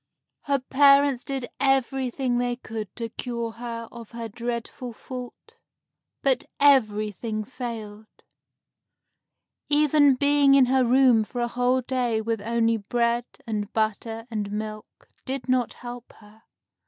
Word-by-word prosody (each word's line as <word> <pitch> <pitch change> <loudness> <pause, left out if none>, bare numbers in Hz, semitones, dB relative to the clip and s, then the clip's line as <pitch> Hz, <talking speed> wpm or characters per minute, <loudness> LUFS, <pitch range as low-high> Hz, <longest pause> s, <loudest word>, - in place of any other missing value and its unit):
Her 280 -1 +2
parents 275 0 +4
did 270 -3 -4
everything 265 -2 +1
they 245 0 0
could 220 -4 -6
to 230 -1 -4
cure 235 -1 -4
her 230 0 -6
of 235 -2 -10
her 230 -1 -5
dreadful 235 +2 -5
fault, 255 - -10 0.7
but 265 -3 +2 0.2
everything 215 -5 +2
failed. 220 -3 -7 1.6
Even 295 -1 +4
being 285 0 +4
in 270 -2 +6
her 260 +1 +3
room 250 -2 +5
for 245 +3 -7
a 240 - +1
whole 250 +2 +1
day 245 -3 0
with 225 -1 -2
only 230 +1 +1
bread 235 +3 0 0.2
and 215 -2 -3
butter 225 +1 -2
and 205 -2 -3
milk 215 0 -7 0.2
did 265 -2 -5
not 255 -2 +1
help 240 0 -9
her. 215 +1 -19
240 Hz, 130 wpm, -25 LUFS, 225-260 Hz, 1.6 s, in